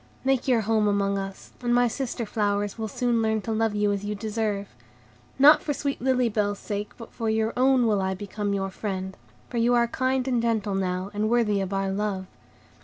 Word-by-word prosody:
Make 270 Hz, -1 st, +1 dB
your 245 Hz, -3 st, +3 dB
home 215 Hz, 0 st, +2 dB
among 200 Hz, -1 st, +1 dB
us, 195 Hz, 0 st, -7 dB
and 240 Hz, -1 st, +1 dB
my 245 Hz, 0 st, +4 dB
sister 240 Hz, 0 st, -3 dB
flowers 205 Hz, -1 st, -1 dB
will 220 Hz, -1 st, -4 dB
soon 235 Hz, +2 st, 0 dB
learn 220 Hz, 0 st, +1 dB
to 225 Hz, -, -4 dB
love 220 Hz, -1 st, 0 dB
you 205 Hz, 0 st, +2 dB
as 200 Hz, 0 st, -2 dB
you 210 Hz, 0 st, -3 dB
deserve. 210 Hz, -1 st, -2 dB, 0.7 s
Not 295 Hz, +3 st, +7 dB
for 290 Hz, -, -2 dB
sweet 280 Hz, 0 st, -3 dB
Lily 255 Hz, -1 st, +2 dB
Bell's 205 Hz, -2 st, 0 dB
sake, 205 Hz, 0 st, -5 dB
but 230 Hz, -, -11 dB
for 225 Hz, -2 st, -2 dB
your 220 Hz, +1 st, +1 dB
own, 255 Hz, 0 st, +4 dB
will 210 Hz, -3 st, +2 dB
I 190 Hz, 0 st, -1 dB
become 205 Hz, +1 st, -4 dB
your 195 Hz, -1 st, -2 dB
friend; 190 Hz, -1 st, -4 dB, 0.3 s
for 240 Hz, -, -5 dB
you 235 Hz, +1 st, +3 dB
are 235 Hz, 0 st, +3 dB
kind 260 Hz, +2 st, 0 dB
and 245 Hz, -3 st, +1 dB
gentle 220 Hz, -3 st, 0 dB
now, 185 Hz, 0 st, -2 dB
and 210 Hz, +1 st, 0 dB
worthy 220 Hz, -4 st, +2 dB
of 190 Hz, 0 st, -3 dB
our 195 Hz, 0 st, -1 dB
love. 195 Hz, -1 st, -2 dB
215 Hz, 210 wpm, -26 LUFS, 200-240 Hz, 0.7 s, Not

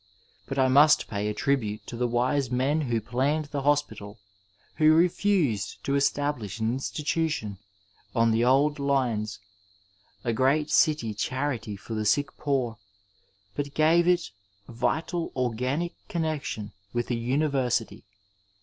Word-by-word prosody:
But 135 Hz, -, -4 dB
I 130 Hz, -1 st, +4 dB
must 145 Hz, +3 st, +5 dB
pay 105 Hz, -1 st, -3 dB
a 105 Hz, -, -1 dB
tribute 110 Hz, -5 st, -1 dB
to]|the 120 Hz, +1 st, -2 dB
wise 125 Hz, +3 st, 0 dB
men 135 Hz, +5 st, +1 dB
who 120 Hz, -5 st, 0 dB
planned 135 Hz, +8 st, 0 dB
the 140 Hz, -, -2 dB
hos 145 Hz, +1 st, +3 dB
pital, 105 Hz, -4 st, -11 dB, 0.6 s
who 155 Hz, 0 st, +5 dB
refused 170 Hz, -, +1 dB
to 140 Hz, -, -1 dB
establish 140 Hz, -6 st, 0 dB
an 110 Hz, +1 st, 0 dB
institution 145 Hz, -, -2 dB, 0.6 s
on 115 Hz, 0 st, +3 dB
the 115 Hz, +1 st, +2 dB
old 140 Hz, +4 st, +3 dB
lines— 125 Hz, -7 st, 0 dB, 0.9 s
a 115 Hz, -, 0 dB
great 145 Hz, +5 st, +2 dB
city 150 Hz, -10 st, +3 dB
cfaftrity 125 Hz, -2 st, -3 dB
for 95 Hz, +4 st, -8 dB
the 110 Hz, -1 st, -2 dB
sick 140 Hz, +7 st, +1 dB
poor, 130 Hz, -6 st, -1 dB, 0.7 s
but 145 Hz, +4 st, -4 dB
gave 165 Hz, +3 st, +4 dB
it 180 Hz, -1 st, +2 dB, 0.4 s
vital 160 Hz, +8 st, -2 dB
organic 130 Hz, +7 st, -1 dB
connexion 155 Hz, -, -3 dB, 0.2 s
with 120 Hz, +1 st, -2 dB
a -, -, +1 dB
University. 125 Hz, -3 st, 0 dB
130 Hz, 130 wpm, -27 LUFS, 115-150 Hz, 0.9 s, must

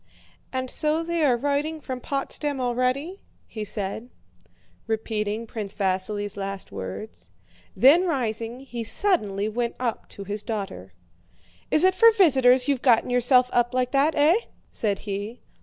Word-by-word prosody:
"And 260 Hz, -1 st, -3 dB
so 310 Hz, +1 st, 0 dB
they 335 Hz, -1 st, -1 dB
are 255 Hz, -5 st, +3 dB
writing 290 Hz, +4 st, -1 dB
from 260 Hz, -3 st, -6 dB
Potsdam 280 Hz, +1 st, -3 dB
already?" 255 Hz, +9 st, -1 dB, 0.3 s
he 215 Hz, -, -6 dB
said, 210 Hz, +3 st, -4 dB, 0.8 s
repeating 220 Hz, 0 st, -2 dB
Prince 215 Hz, -3 st, -5 dB
Vasíli's 200 Hz, +1 st, -1 dB
last 195 Hz, -1 st, -6 dB
words. 95 Hz, -2 st, -7 dB, 0.5 s
Then 285 Hz, -, +6 dB
rising, 235 Hz, -4 st, -2 dB
he 245 Hz, -4 st, -6 dB
suddenly 215 Hz, -, +1 dB
went 235 Hz, +2 st, -2 dB
up 245 Hz, -3 st, -3 dB
to 200 Hz, -, -9 dB
his 205 Hz, +1 st, -3 dB
daughter. 195 Hz, -, -6 dB, 0.8 s
"Is 305 Hz, -, +5 dB
it 375 Hz, 0 st, +5 dB
for 460 Hz, +4 st, +6 dB
visitors 265 Hz, -, +5 dB
you've 275 Hz, -3 st, 0 dB
got 235 Hz, -4 st, +4 dB
yourself 250 Hz, +1 st, +4 dB
up 240 Hz, +1 st, +1 dB
like 250 Hz, -1 st, 0 dB
that, 285 Hz, +3 st, +2 dB
eh?" 300 Hz, +3 st, +5 dB, 0.4 s
said 205 Hz, -3 st, -1 dB
he. 205 Hz, +3 st, -5 dB
245 Hz, 140 wpm, -24 LUFS, 210-280 Hz, 0.8 s, Then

